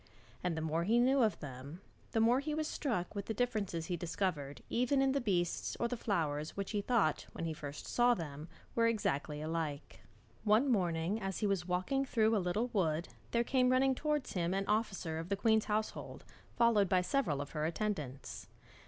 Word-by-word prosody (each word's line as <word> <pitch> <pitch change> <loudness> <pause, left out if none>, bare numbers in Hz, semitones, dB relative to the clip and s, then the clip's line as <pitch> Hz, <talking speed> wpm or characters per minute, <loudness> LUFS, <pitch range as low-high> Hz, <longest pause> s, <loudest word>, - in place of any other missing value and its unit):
And 175 -2 -1
the - - -1
more 160 +1 0
he 220 +6 +3
knew 260 +3 +4
of 220 -3 +2
them, 140 +4 -8 0.3
the 225 - +1
more 235 +3 +4
he 300 +2 -2
was 310 0 -1
struck 225 - -2
with 200 -2 -5
the 220 - -2
differences 205 -9 -1
he 180 - -2
discovered 160 -6 -2
even 250 +3 +1
in 270 0 +3
the 275 +1 +1
beasts 180 -6 0
or 235 - +1
flowers 165 -11 -1
which 200 -1 -3
he 210 -2 0
thought 205 -8 +1
when 165 - -4
he 160 - -2
first 145 -1 -7
saw 240 0 +3
them 150 -3 -6 0.3
were 230 0 +3
exactly 150 -9 -1
alike. 155 -2 -3 0.4
One 225 +6 +4
morning 180 0 +1
as 195 -1 -2
he 215 - -1
was 195 -3 0
walking 185 +10 0
through 225 -4 +2
a 205 - +2
little 200 +7 0
wood 170 -6 0 0.2
there 235 0 +2
came 255 0 +3
running 260 +1 +4
towards 300 0 -1
him 175 0 0
an 195 0 0
officer 195 -6 -1
of 165 +2 -6
the 200 - 0
queen's 220 +1 +3
household, 215 0 -3 0.3
followed 225 -5 +4
by 185 -1 +4
several 180 - 0
of 145 0 -5
her 155 -1 -2
attendants. 160 -7 -4
200 Hz, 195 wpm, -34 LUFS, 165-235 Hz, 0.4 s, knew